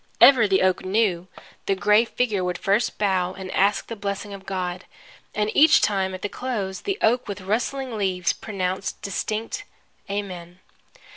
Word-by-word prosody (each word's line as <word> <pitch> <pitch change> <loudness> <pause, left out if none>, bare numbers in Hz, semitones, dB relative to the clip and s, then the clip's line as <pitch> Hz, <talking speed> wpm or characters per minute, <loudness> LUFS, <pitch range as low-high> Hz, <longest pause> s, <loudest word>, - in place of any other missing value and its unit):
Ever, 250 -6 +8
the 190 -1 +3
oak 185 -1 +2
knew, 185 -3 +1 0.4
the 195 - +2
gray 210 +4 +4
figure 220 -5 -1
would 180 -1 -2
first 200 +4 +1
bow 185 -3 +1
and 190 -1 -7
ask 200 +2 +2
the 230 - -6
blessing 200 0 -4
of 195 -1 -10
God. 180 -1 -3 0.5
And 210 0 0
each 310 +2 +7
time 190 -2 0
at 185 - -10
the - - +1
close 205 -5 -4
the 395 -1 -2
oak 240 +3 +3
with 200 -1 -5
rustling 245 +5 -2
leaves 185 -4 0
pronounced 190 -2 -3
distinct 220 - -3 0.5
Amen! 180 -4 -5
200 Hz, 160 wpm, -24 LUFS, 185-220 Hz, 0.5 s, Ever